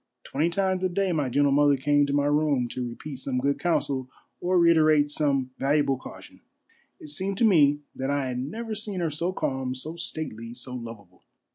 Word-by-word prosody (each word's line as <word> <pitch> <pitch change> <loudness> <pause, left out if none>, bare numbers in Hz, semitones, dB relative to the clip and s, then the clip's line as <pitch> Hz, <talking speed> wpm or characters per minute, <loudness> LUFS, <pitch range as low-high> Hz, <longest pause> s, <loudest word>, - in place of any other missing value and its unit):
Twenty 155 +5 0
times 190 +1 0
a 185 - +2
day 190 +1 0
my 150 -6 0
gentle 145 +3 +3
mother 145 0 +4
came 145 +2 +2
to - - -2
my 145 0 +2
room 145 -4 +2
to 125 0 -4
repeat 135 +4 -8
some 130 0 -3
good 140 +2 0
counsel 135 -6 -1 0.3
or 180 +1 +1
reiterate 155 -3 +4
some 140 -4 0
valuable 140 0 +2
caution. - - -12 0.6
It 150 - -11
seemed 190 +6 -1
to 230 - +3
me 145 -8 +4
that 135 +1 -3
I 140 -1 0
had 125 0 -3
never 220 - -4
seen 210 -3 -3
her 165 -3 -1
so 170 +5 -1
calm, 130 -7 -2
so 155 +6 -6
stately, 120 -9 -5
so 125 +1 -7
lovable. 115 -7 -9
145 Hz, 190 wpm, -26 LUFS, 130-170 Hz, 0.6 s, mother